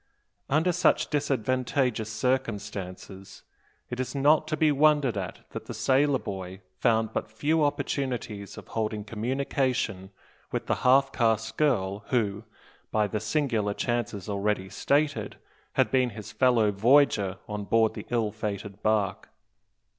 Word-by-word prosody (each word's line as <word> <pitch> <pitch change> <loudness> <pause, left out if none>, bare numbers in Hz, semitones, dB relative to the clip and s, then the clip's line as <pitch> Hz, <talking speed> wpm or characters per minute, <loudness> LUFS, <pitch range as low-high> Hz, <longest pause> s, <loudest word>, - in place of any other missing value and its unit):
Under 160 +6 +3
such 175 +1 +2
disadvantageous 130 -4 0
circumstances, 105 -5 -3 0.5
it 125 - -4
is 130 +2 -3
not 150 +3 +4
to 155 - -1
be 155 -2 +4
wondered 145 -4 +3
at 95 -3 -5
that - - -7
the - - -6
sailor 135 +1 +3
boy 95 -3 -7 0.2
found 110 -2 +2
but - - -3
few 150 +9 +1
opportunities 130 -8 -2
of - - -11
holding 110 -1 -2
communication 115 -3 -1 0.4
with - - -2
the - - +1
half 135 +1 +5
caste 110 -2 +1
girl, 100 -10 +1
who, 110 -4 0 0.4
by 110 -1 +2
the 105 +1 -2
singular 110 -4 0
chances 120 -5 -2
already 100 -1 -1
stated, 140 -6 0 0.4
had - - +2
been 130 -2 +3
his 105 -2 -9
fellow 120 -5 +3
voyager 105 -3 +3
on 105 -1 -4
board 110 +1 +3
the - - -8
ill 115 -3 0
fated 105 -2 -5
bark. 105 -3 0
115 Hz, 135 wpm, -27 LUFS, 105-135 Hz, 0.5 s, half